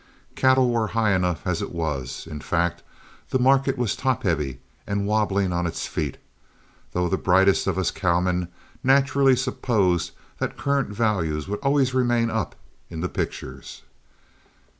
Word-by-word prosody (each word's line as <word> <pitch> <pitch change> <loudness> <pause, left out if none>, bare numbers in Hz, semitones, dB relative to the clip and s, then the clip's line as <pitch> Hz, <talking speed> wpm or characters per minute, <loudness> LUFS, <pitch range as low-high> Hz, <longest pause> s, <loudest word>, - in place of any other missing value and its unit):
Cattle 130 -1 +4
were 115 -2 +1
high 110 -3 +3
enough 90 -1 0
as 90 -3 -1
it - - -4
was; 75 -7 -3
in 80 -2 -7
fact 85 +2 0 0.5
the - - +2
market 135 +1 +3
was 120 -4 0
top 130 -2 -1
heavy 75 -8 -1 0.3
and 100 0 -1
wobbling 100 -3 +1
on 85 0 0
its 80 - -4
feet, - - -3 0.8
though 90 0 +1
the 95 - 0
brightest 95 +1 +3
of - - 0
us 95 -4 +1
cowmen 90 -1 0 0.4
naturally 135 0 +4
supposed 100 -9 +1 0.3
that - - -3
current 140 -3 0
values 95 -9 -1
would 105 +1 -3
always 140 -2 +2
remain 120 -2 +2
up 110 -3 -2 0.3
in 80 -2 -6
the 90 - -1
pictures. - - -5
100 Hz, 150 wpm, -24 LUFS, 90-125 Hz, 0.8 s, Cattle